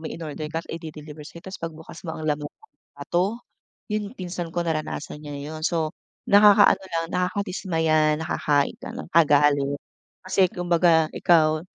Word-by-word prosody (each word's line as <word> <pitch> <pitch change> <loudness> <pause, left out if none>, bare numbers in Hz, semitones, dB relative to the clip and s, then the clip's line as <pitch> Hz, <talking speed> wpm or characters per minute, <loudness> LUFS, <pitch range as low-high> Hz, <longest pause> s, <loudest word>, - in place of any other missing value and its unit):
may 160 - -6
inorder 155 -1 -6
ka, 165 0 -3
tas - - -12
ide-deliver 155 -2 -8
sa'yo, 170 - -12
ta's 190 -1 -8
pagbukas 160 -1 -8
mo, 160 - -4
ang 155 - -6
laman 150 -1 -1 0.5
bato. 200 +7 -1 0.5
Yun 210 +1 -3
pinsan 175 -1 -5
ko, 175 - 0
naranasan 155 -2 -3
niya 145 -1 -8 0.2
yun. 155 - -7
So, 160 -3 -1 0.4
nakakaano 205 0 +7
lang, 165 -1 -1
nakakadismaya, 175 -5 +1
nakaka-ig 155 +2 0
ano, 240 +3 -6
kagalit. 145 -3 +4 0.5
Kasi 185 0 +3
kumbaga 170 -2 +3
ikaw, 155 -2 +3
165 Hz, 145 wpm, -24 LUFS, 155-180 Hz, 0.5 s, nakakaano